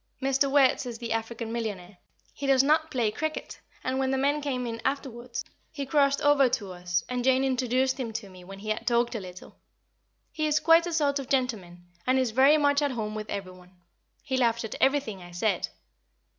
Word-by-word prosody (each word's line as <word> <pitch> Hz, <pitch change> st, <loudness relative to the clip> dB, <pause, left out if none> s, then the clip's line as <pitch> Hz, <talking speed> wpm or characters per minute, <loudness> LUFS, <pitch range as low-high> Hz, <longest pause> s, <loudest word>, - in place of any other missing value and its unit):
Mr. 275 Hz, +1 st, +1 dB
Wertz 270 Hz, -1 st, +3 dB
is 235 Hz, -2 st, -5 dB
the 230 Hz, -1 st, -3 dB
African 225 Hz, 0 st, -4 dB
millionaire. 205 Hz, -5 st, -5 dB, 0.3 s
He 280 Hz, -, -5 dB
does 270 Hz, -1 st, +5 dB
not 310 Hz, +2 st, +2 dB
play 240 Hz, -7 st, 0 dB
cricket, 310 Hz, +6 st, -4 dB, 0.2 s
and, 260 Hz, +1 st, -1 dB
when 265 Hz, 0 st, +1 dB
the 265 Hz, -, +1 dB
men 285 Hz, +3 st, +1 dB
came 260 Hz, -4 st, -2 dB
in 230 Hz, -1 st, -5 dB
afterwards, 250 Hz, -3 st, -3 dB, 0.3 s
he 285 Hz, -3 st, -4 dB
crossed 280 Hz, 0 st, +2 dB
over 290 Hz, -3 st, +5 dB
to 200 Hz, -5 st, -3 dB
us, 180 Hz, -1 st, -2 dB
and 250 Hz, -1 st, -2 dB
Jane 260 Hz, +1 st, +3 dB
introduced 260 Hz, 0 st, +1 dB
him 240 Hz, -3 st, -3 dB
to 220 Hz, -2 st, -5 dB
me 185 Hz, -1 st, -14 dB
when 195 Hz, +2 st, -10 dB
he 215 Hz, +2 st, -7 dB
had 220 Hz, +2 st, -2 dB
talked 240 Hz, 0 st, +2 dB
a 225 Hz, -, -3 dB
little. 185 Hz, -2 st, -11 dB, 0.7 s
He 310 Hz, -1 st, -1 dB
is 300 Hz, 0 st, +2 dB
quite 330 Hz, +2 st, +5 dB
a 345 Hz, -, -3 dB
sort 290 Hz, -3 st, +1 dB
of 275 Hz, -, -7 dB
gentleman, 215 Hz, -10 st, -2 dB, 0.2 s
and 260 Hz, +1 st, +3 dB
is 255 Hz, -3 st, +1 dB
very 270 Hz, +6 st, +5 dB
much 285 Hz, -1 st, +3 dB
at 290 Hz, -, +1 dB
home 220 Hz, -5 st, -3 dB
with 215 Hz, 0 st, -6 dB
every 195 Hz, -2 st, -4 dB
one. 180 Hz, 0 st, -17 dB, 0.5 s
He 265 Hz, -2 st, -1 dB
laughed 235 Hz, -2 st, +2 dB
at 220 Hz, -, -5 dB
everything 270 Hz, -8 st, +1 dB
I 175 Hz, -, -11 dB
said. 175 Hz, +2 st, 0 dB
250 Hz, 210 wpm, -27 LUFS, 215-275 Hz, 0.7 s, does